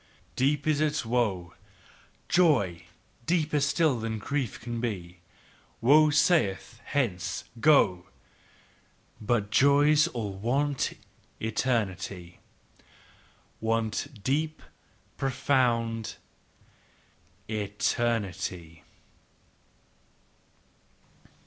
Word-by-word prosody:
"Deep 140 Hz, +2 st, +1 dB
is 155 Hz, -1 st, +1 dB
its 150 Hz, -3 st, 0 dB
woe, 105 Hz, -8 st, -1 dB, 0.7 s
"Joy 105 Hz, -, +2 dB, 0.4 s
deeper 155 Hz, -3 st, +1 dB
still 140 Hz, -1 st, +2 dB
than 110 Hz, 0 st, -3 dB
grief 135 Hz, +2 st, -3 dB
can 120 Hz, 0 st, -5 dB
be: 90 Hz, -7 st, -4 dB, 0.6 s
"Woe 150 Hz, +5 st, +6 dB
saith: 130 Hz, -, +1 dB
Hence! 100 Hz, -9 st, -2 dB, 0.2 s
Go! 105 Hz, -, +4 dB, 1.1 s
"But 105 Hz, -2 st, 0 dB
joys 145 Hz, +5 st, +5 dB
all 110 Hz, -9 st, -4 dB
want 135 Hz, +8 st, -1 dB, 0.5 s
eternity, 100 Hz, -6 st, -2 dB, 0.6 s
" -, -, -30 dB
Want 115 Hz, +2 st, -2 dB
deep, 155 Hz, +5 st, -1 dB, 0.5 s
profound 120 Hz, -4 st, 0 dB, 1.3 s
eternity!" 100 Hz, -5 st, -2 dB
120 Hz, 70 wpm, -28 LUFS, 100-145 Hz, 1.3 s, Woe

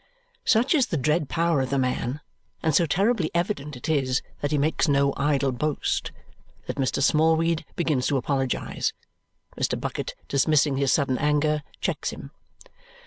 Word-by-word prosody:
Such 240 Hz, +6 st, +3 dB
is 275 Hz, -6 st, +3 dB
the 165 Hz, -, -1 dB
dread 150 Hz, +1 st, +1 dB
power 165 Hz, -3 st, +1 dB
of 130 Hz, -, -2 dB
the 140 Hz, -, 0 dB
man, 130 Hz, +1 st, -1 dB, 0.4 s
and 160 Hz, -, +2 dB
so 170 Hz, +2 st, +4 dB
terribly 195 Hz, +2 st, +1 dB
evident 170 Hz, -5 st, -1 dB
it 125 Hz, -, -7 dB
is 135 Hz, -4 st, +1 dB, 0.2 s
that 145 Hz, -, -1 dB
he 150 Hz, -, +1 dB
makes 155 Hz, +4 st, +1 dB
no 140 Hz, -1 st, +3 dB
idle 140 Hz, -1 st, +1 dB
boast, 145 Hz, +4 st, -1 dB, 0.5 s
that -, -, -5 dB
Mr. 135 Hz, 0 st, 0 dB
Smallweed 160 Hz, +2 st, +3 dB
begins 150 Hz, -7 st, 0 dB
to 140 Hz, -, +1 dB
apologize. 135 Hz, 0 st, -1 dB, 0.6 s
Mr. -, -, -1 dB
Bucket, -, -, -4 dB
dismissing 140 Hz, 0 st, +2 dB
his 140 Hz, -1 st, +2 dB
sudden 135 Hz, -4 st, +1 dB
anger, 150 Hz, +1 st, +1 dB, 0.2 s
checks -, -, -1 dB
him. -, -, -9 dB
150 Hz, 155 wpm, -25 LUFS, 135-160 Hz, 0.6 s, so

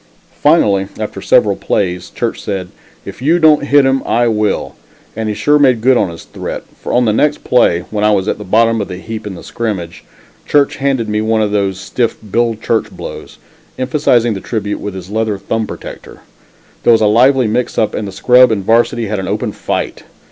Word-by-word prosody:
Finally, 105 Hz, -, +3 dB
after -, -, -5 dB
several -, -, +3 dB
plays, 90 Hz, -2 st, -2 dB
Church 120 Hz, -2 st, -3 dB
said, 95 Hz, -3 st, -4 dB, 0.4 s
"If -, -, -9 dB
you 160 Hz, +6 st, +3 dB
don't 155 Hz, -3 st, +4 dB
hit 145 Hz, -1 st, +5 dB
him, 135 Hz, 0 st, +2 dB
I 120 Hz, +1 st, +1 dB
will," 105 Hz, -1 st, -1 dB, 0.4 s
and 110 Hz, 0 st, -3 dB
he 105 Hz, -, -2 dB
sure 150 Hz, +5 st, +2 dB
made 130 Hz, -5 st, +4 dB
good 130 Hz, +3 st, +3 dB
his 85 Hz, 0 st, -10 dB
threat, -, -, -6 dB, 0.2 s
for -, -, -5 dB
on 125 Hz, 0 st, +3 dB
the 110 Hz, -, +2 dB
next 150 Hz, +7 st, +1 dB
play, 90 Hz, -8 st, +3 dB
when 105 Hz, -1 st, -2 dB
I 105 Hz, -, +4 dB
was 100 Hz, -1 st, +1 dB
at -, -, -1 dB
the -, -, -6 dB
bottom 115 Hz, +3 st, +2 dB
of 100 Hz, -, -4 dB
the 90 Hz, -, -7 dB
heap 110 Hz, +2 st, -7 dB
in 100 Hz, -, -6 dB
the -, -, -11 dB
scrimmage, 95 Hz, -8 st, -5 dB, 0.4 s
Church 145 Hz, -2 st, +2 dB
handed 135 Hz, -4 st, 0 dB
me 105 Hz, 0 st, -1 dB
one 110 Hz, 0 st, +1 dB
of 105 Hz, -, -1 dB
those 100 Hz, -2 st, -1 dB
stiff 115 Hz, +3 st, -2 dB
"Bill 115 Hz, +1 st, +1 dB
Church 110 Hz, +1 st, -1 dB
blows," -, -, -9 dB, 0.4 s
emphasizing 130 Hz, -3 st, +1 dB
the 95 Hz, -, -6 dB
tribute 105 Hz, -3 st, -3 dB
with 100 Hz, -2 st, -6 dB
his 95 Hz, +1 st, -8 dB
leather 110 Hz, -1 st, -1 dB
thumb 110 Hz, +3 st, -3 dB
protector. -, -, -10 dB, 0.6 s
There 120 Hz, -, +5 dB
was 115 Hz, -, +3 dB
a -, -, +4 dB
lively 125 Hz, +4 st, +4 dB
mixup 110 Hz, -1 st, 0 dB
and 105 Hz, -, -3 dB
the -, -, -6 dB
scrub 125 Hz, +5 st, +5 dB
and 100 Hz, -3 st, -1 dB
Varsity 115 Hz, +1 st, +2 dB
had 105 Hz, -1 st, -3 dB
an 95 Hz, -, -4 dB
open -, -, -2 dB
fight. -, -, -4 dB
110 Hz, 205 wpm, -15 LUFS, 100-125 Hz, 0.6 s, hit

